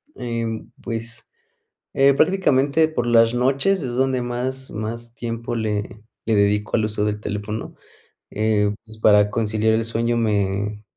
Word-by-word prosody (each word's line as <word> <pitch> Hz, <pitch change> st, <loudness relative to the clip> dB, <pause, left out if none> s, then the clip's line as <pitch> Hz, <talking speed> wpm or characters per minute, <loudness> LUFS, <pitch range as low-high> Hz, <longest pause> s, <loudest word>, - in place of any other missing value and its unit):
Em, 115 Hz, -2 st, -4 dB
pues, 115 Hz, 0 st, -6 dB, 0.6 s
eh, 135 Hz, 0 st, +5 dB
prácticamente 155 Hz, -3 st, +3 dB
por 120 Hz, -7 st, -2 dB
las 115 Hz, 0 st, +5 dB
noches 135 Hz, +10 st, +1 dB
es 125 Hz, -3 st, -4 dB
donde 130 Hz, -1 st, +1 dB
más 130 Hz, +2 st, -4 dB
más 115 Hz, +2 st, -6 dB
tiempo 115 Hz, 0 st, -4 dB
le 105 Hz, -1 st, -3 dB, 0.2 s
le 110 Hz, -1 st, +2 dB
dedico 105 Hz, +2 st, +2 dB
al 110 Hz, -, +1 dB
uso 105 Hz, -1 st, -2 dB
del 105 Hz, 0 st, -1 dB
teléfono, 105 Hz, +1 st, -5 dB, 0.5 s
eh, 105 Hz, -1 st, +1 dB
pues 110 Hz, -1 st, -13 dB
para 105 Hz, -1 st, +5 dB
conciliar 110 Hz, 0 st, +1 dB
el 115 Hz, 0 st, +1 dB
sueño 115 Hz, +1 st, 0 dB
me 105 Hz, -1 st, -1 dB
115 Hz, 140 wpm, -22 LUFS, 105-120 Hz, 0.6 s, eh